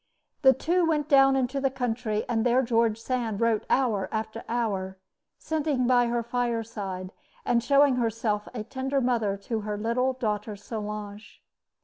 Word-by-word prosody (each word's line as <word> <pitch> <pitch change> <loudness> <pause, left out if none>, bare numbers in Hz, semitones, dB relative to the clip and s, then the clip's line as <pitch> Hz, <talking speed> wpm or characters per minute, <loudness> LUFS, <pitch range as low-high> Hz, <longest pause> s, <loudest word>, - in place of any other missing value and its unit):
The 265 0 +7
two 345 +7 +1
went 305 -3 +1
down 270 -2 +5
into 265 +1 0
the 270 - +2
country; 240 -4 -2
and 225 -2 0
there 250 +2 +3
George 230 -2 +1
Sand 230 -4 -2
wrote 230 -2 +1
hour 215 -8 +1
after 220 +1 -4
hour, 200 -5 -2 0.4
sitting 300 -5 -1
by 245 -1 +4
her 235 0 -1
fireside, 225 -6 -3 0.3
and 235 -1 +2
showing 280 0 +4
herself 225 -3 -1
a 230 -4 -5
tender 265 +3 -2
mother 230 -6 0
to 225 0 -2
her 210 0 -4
little 240 +5 0
daughter 215 -4 -3
Solange. 210 0 -7
235 Hz, 150 wpm, -27 LUFS, 215-260 Hz, 0.4 s, The